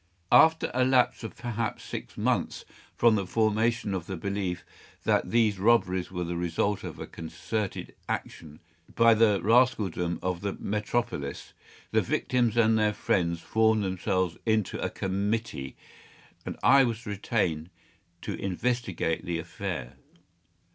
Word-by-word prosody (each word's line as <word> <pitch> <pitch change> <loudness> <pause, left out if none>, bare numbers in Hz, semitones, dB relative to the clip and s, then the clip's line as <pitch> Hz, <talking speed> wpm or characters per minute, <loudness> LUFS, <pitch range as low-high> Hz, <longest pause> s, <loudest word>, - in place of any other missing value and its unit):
After 160 0 +5
a 130 +1 +2
lapse 125 -1 +2
of 110 - -6
perhaps 115 -2 -3
six - - -7
months - - -1 0.3
from 115 -1 +5
the 100 -3 0
formation 110 +1 +1
of 90 -3 -4
the 95 - -4
belief 95 -1 -3 0.4
that - - +1
these 110 -4 +2
robberies 95 -4 +2
were 90 -1 -3
the 85 0 -3
result 90 +4 -1
of - - -7
a - - -6
concerted 100 +5 -5 0.2
action 75 -2 -5 0.3
by 115 0 +6
the 110 -3 +4
rascaldom 105 -7 +2
of 90 -1 -2
the 100 -1 -2
metropolis, 105 -9 -3 0.4
the - - +3
victims 120 -3 0
and 110 -1 +4
their 105 -1 +2
friends 85 -4 0
formed 110 0 +2
themselves 95 -2 -1
into 110 -3 0
a - - 0
committee, 100 -7 -2 0.7
and - - -4
I 135 0 +7
was 115 -1 -2
retained 95 -6 -1 0.5
to - - -3
investigate 95 -4 -2
the 85 -2 -2
affair. 85 -6 -5
105 Hz, 135 wpm, -28 LUFS, 90-115 Hz, 0.7 s, I